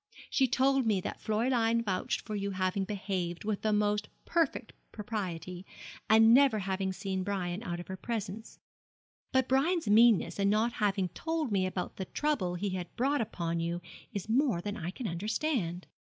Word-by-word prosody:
She 265 - +3
told 265 0 +2
me 205 -3 +3
that - - -5
Fräulein 230 +1 +1
vouched 185 -3 -1
for 215 - -7
your 200 -1 -2
having 185 +1 0
behaved 185 -4 -3
with 210 -1 -2
the 215 - +1
most 210 0 +1 0.2
perfect 320 -8 0 0.2
propriety, 185 -5 -5 0.5
and 225 +1 +7
never 270 -3 +6
having 190 -1 -1
seen 190 0 -3
Brian 185 -1 -2
out 175 -6 -4
of 175 - -7
her 190 - -6
presence; 220 0 -5 0.7
but 260 -1 +2
Brian's 315 +5 +2
meanness 220 -1 +5
in 200 0 +3
not 220 +3 +2
having 195 -3 0
told 320 - -2
me 190 -2 +2
about 185 -1 -4
the 190 - -3
trouble 260 -9 -1
he 195 +2 -2
had 180 -2 -5
brought 275 +2 +1
upon 170 -6 -2
you 170 +1 -2 0.3
is 200 -3 -5
more 240 - +2
than 205 +3 -4
I 170 -3 -4
can 225 +5 -5
understand. 185 - -1
205 Hz, 170 wpm, -31 LUFS, 185-235 Hz, 0.7 s, and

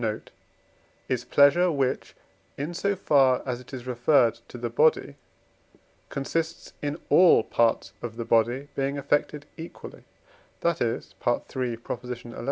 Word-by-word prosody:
note) 110 -1 -3 0.8
is 125 -2 -1
pleasure, 170 +8 +4
which, 135 -4 -1 0.4
in 150 +5 -4
so 200 +3 0
far 135 -8 +3
as 125 -2 -3
it 125 - -16
is 130 -2 -7
referred 125 -1 +3
to - - -10
the 120 0 -3
body, 145 +4 +2 1.0
consists 160 +4 -3
in 145 +1 -2
all 180 -10 +6
parts 115 -5 +1
of 115 -2 -6
the 115 0 -5
body 120 +5 +1
being 140 +1 -2
affected 145 +1 -1
equally: 165 +1 -10 0.6
that 170 -1 0
is 115 -1 -2 0.4
(III. 125 -3 -2 0.4
xi.) 120 0 -12
135 Hz, 135 wpm, -26 LUFS, 120-150 Hz, 1.0 s, all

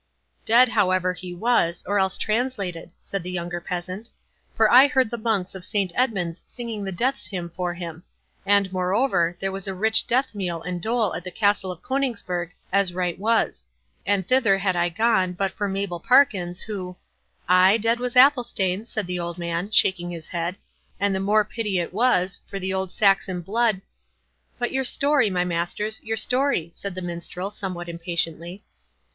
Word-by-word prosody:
"Dead, 240 +3 +6
however, 185 -4 +2
he 180 0 -7
was, 175 -3 +1
or 205 +1 +1
else 190 -1 +1
translated," 215 -7 -2
said 195 - -4
the 180 - -6
younger 175 -1 -4
peasant; 180 +5 -5 0.5
"for 220 - +4
I 255 +5 +8
heard 260 -4 +1
the 235 - -3
Monks 215 -5 0
of 190 -2 -8
Saint 195 -3 -1
Edmund's 190 -9 -1
singing 230 -4 -5
the 195 - -3
death's 255 +9 0
hymn 175 -3 -5
for 175 0 -3
him; 170 -2 -7 0.4
and, 200 -1 +2
moreover, 185 -2 +1
there 195 0 -2
was 195 0 -4
a 190 - -3
rich 220 +3 +3
death 260 +1 +1
meal 180 -5 -3
and 180 0 -4
dole 220 -2 0
at 165 - -5
the 180 - -6
Castle 200 -1 +1
of 180 - -11
Coningsburgh, 225 -10 -2 0.2
as 195 -3 +2
right 180 -1 -2
was; 225 - 0 0.4
and 195 -2 0
thither 240 -7 +4
had 190 -1 0
I 175 0 +1
gone, 190 -1 +1
but 195 +1 -1
for 205 - -3
Mabel 195 -3 -3
Parkins, 195 -6 +3
who—" 185 -4 -6 0.5
"Ay, 185 +3 +6
dead 230 +2 +1
was 250 0 -3
Athelstane," 240 -7 +3
said 220 -3 -3
the 180 0 -3
old 170 0 -4
man, 170 +2 -3
shaking 185 -4 +3
his 165 -2 -8
head, 170 +1 -2 0.4
"and 200 0 +1
the 190 - 0
more 210 +2 +3
pity 210 -3 -2
it 175 0 -2
was, 195 -5 +2
for 195 - -5
the 190 0 -2
old 190 -1 -2
Saxon 195 -3 +2
blood—" 215 +2 +1 0.8
"But, 245 - -2
your 265 0 0
story, 280 -2 +2
my 180 -2 0
masters—your 210 +6 -2
story," 250 - +1
said 200 0 -5
the 185 - -4
Minstrel, 175 +2 -5
somewhat 185 -4 -5
impatiently. 170 +2 -3
195 Hz, 175 wpm, -24 LUFS, 180-220 Hz, 0.8 s, I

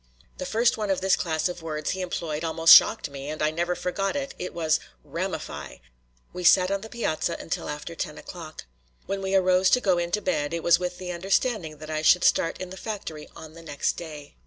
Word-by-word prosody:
The 185 - -4
first 235 +2 +2
one 210 -2 -2
of 190 - +1
this 190 0 +3
class 160 -1 -1
of 180 -1 -6
words 155 -2 -3
he 190 - -3
employed 165 -3 -3
almost 165 0 +6
shocked - - +6
me, 140 +1 -7
and 155 - -5
I 150 0 +1
never 175 +2 -1
forgot 195 +6 -2
it; 275 -1 -3
'twas 165 -3 0 0.2
"ramify." - - -5 0.6
We 180 - -6
sat 185 +2 +5
on 200 0 -1
the 220 - -9
piazza 170 -8 -2
until - - -4
after 150 +3 -6
ten 150 -2 -5
o'clock. 165 -3 -9 0.4
When 195 0 -3
we 190 0 -1
arose 185 0 +4
to 250 - +4
go 185 -7 +2
in 170 0 -2
to 210 - +2
bed, 165 - -1
it 170 - -4
was 170 0 +5
with 180 0 -3
the 180 0 -5
understanding 185 -2 -1
that 155 +1 -8
I 155 0 -1
should 175 +3 +5
start 165 - +2
in 185 -1 -6
the 190 - -8
factory 190 -9 -6
on 155 -1 -11
the 165 - -12
next 145 -3 -1
day. 150 -4 -9
175 Hz, 220 wpm, -26 LUFS, 155-190 Hz, 0.6 s, almost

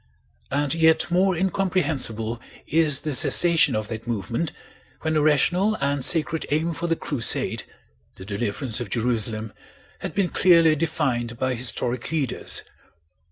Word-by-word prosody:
And 140 0 0
yet 160 +1 +3
more 185 +1 +3
incomprehensible 160 - -1 0.2
is 155 -2 +3
the 150 - -3
cessation 165 0 +4
of 110 0 -2
that 115 +1 -6
movement 115 - -2 0.5
when 160 0 -1
a 155 - +3
rational 175 +8 +3
and 140 -3 -1
sacred 160 +1 0
aim 160 +3 0
for 165 +2 -4
the 165 - +1
Crusade—the 115 -8 -4
deliverance 110 +4 -3
of 120 -4 -5
Jerusalem—had 110 - -3
been 195 -3 +1
clearly 165 -3 +5
defined 135 -7 -1
by 130 +1 0
historic 120 0 -2
leaders. 150 -6 -1
145 Hz, 125 wpm, -24 LUFS, 120-165 Hz, 0.5 s, clearly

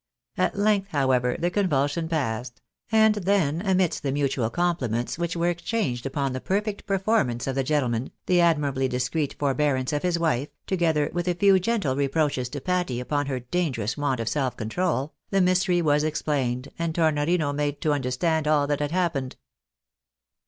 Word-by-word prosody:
At - - 0
length, 205 -1 +2
how 135 -3 +2
ever, 125 -1 +1
the 175 +1 -1
convulsion 160 -4 0
passed, 125 -6 -2 0.3
and 220 -1 +5
then 185 -6 +1
amidst 190 -3 +1
the 140 - -1
mutual 135 -4 0
compliments 130 -7 -1
which 170 0 -2
were 170 +1 +1
exchanged 170 - -2
upon 135 -1 -2
the 130 - -4
perfect 205 +2 -2
performance 190 - +1
of 135 - -1
the 135 0 0
gentle 145 -2 +1
man, 120 +3 -2 0.2
the 180 -1 +3
admirably 145 -6 +2
discreet 130 +4 -1
forbearance 140 -2 0
of 145 - 0
his 180 -1 +1
wife, 150 -5 0 0.2
together 165 -5 +1
with 175 +1 -2
a 180 - +1
few 195 +1 +5
gentle 190 - 0
reproaches 140 -2 0
to 145 - -5
Patty 180 -6 -1
upon 145 +3 -1
her 130 -2 -2
dangerous 125 - -2
want 145 -4 -1
of 115 - -3
self 130 +1 -1
control, 145 +5 -1 0.2
the 195 - +2
mystery 180 -1 +2
was 150 -1 +3
explained, 140 -4 -1
and 165 -1 -2
Tornorino 155 -1 +1
made 145 0 -2
to 155 -3 +2
under 135 -3 -1
stand 160 +4 0
all 150 -2 +3
that 145 0 -1
had 145 0 -1
happened. 165 -8 -1
150 Hz, 175 wpm, -25 LUFS, 130-175 Hz, 0.3 s, and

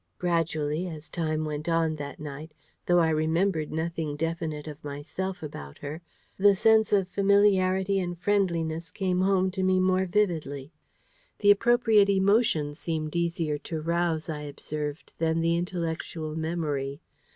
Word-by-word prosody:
Gradually, 165 -1 0
as 160 -2 -8
time 155 -2 -1
went 150 +1 -4
on 165 -1 +1
that 145 -2 -7
night, 150 +1 -8 0.3
though 175 - +4
I 165 -2 +4
remembered 160 +1 +1
nothing 160 -2 -2
definite 160 -1 -3
of 150 -1 -9
myself 160 +6 -5
about 70 - -8
her, 150 +3 -7 0.4
the 200 0 +6
sense 220 +1 +4
of 195 -3 +3
familiarity 195 -1 +3
and 175 -1 -3
friendliness 170 -4 0
came 185 0 -1
home 190 -1 +2
to 190 0 -3
me 185 0 +3
more 185 0 +2
vividly. 160 -8 -1 0.7
The 205 -1 +5
appropriate 225 -1 +4
emotion 195 -6 +2
seemed 155 0 -4
easier 170 -3 -1
to 160 +2 -5
rouse, 170 0 0
I 155 -2 -4
observed, 150 +1 -6
than 165 0 +1
the 165 0 +2
intellectual 165 -2 -3
memory. 155 -4 -2
165 Hz, 140 wpm, -27 LUFS, 155-185 Hz, 0.7 s, the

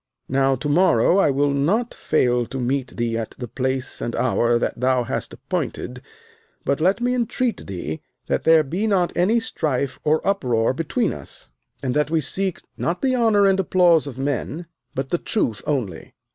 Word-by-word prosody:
Now 135 0 +2
to 130 - -4
morrow 165 - +4
I 175 - +4
will 140 +1 +2
not 185 - +1
fail 125 -5 +1
to 135 - -5
meet 130 +1 -2
thee 115 -1 -1
at 110 - -6
the 120 - -5
place 130 +2 -3
and 120 - -3
hour 120 -2 +2
that 120 - -2
thou 130 0 +2
hast 115 - -4
appointed, - - -4 0.6
but 140 +2 0
let 190 +6 +2
me 245 +1 +1
entreat 245 0 -1
thee 85 -5 -5 0.2
that - - -1
there 160 -1 +6
be 180 +10 -2
not 185 -4 +1
any 205 +7 +3
strife 140 - -2
or 155 +1 +1
uproar 125 - +1
between 160 +3 -1
us, - - -12 0.3
and 130 -2 0
that 150 +1 +1
we 165 0 +2
seek 185 +6 -1
not 170 +8 -2
the 260 -1 +2
honour 220 -4 +4
and 195 -1 +3
applause 175 -4 +4
of 130 -3 -7
men, 145 +4 -2 0.3
but 135 0 -3
the 175 - +1
truth 120 - -1
only. 115 - -3
145 Hz, 180 wpm, -22 LUFS, 125-185 Hz, 0.6 s, there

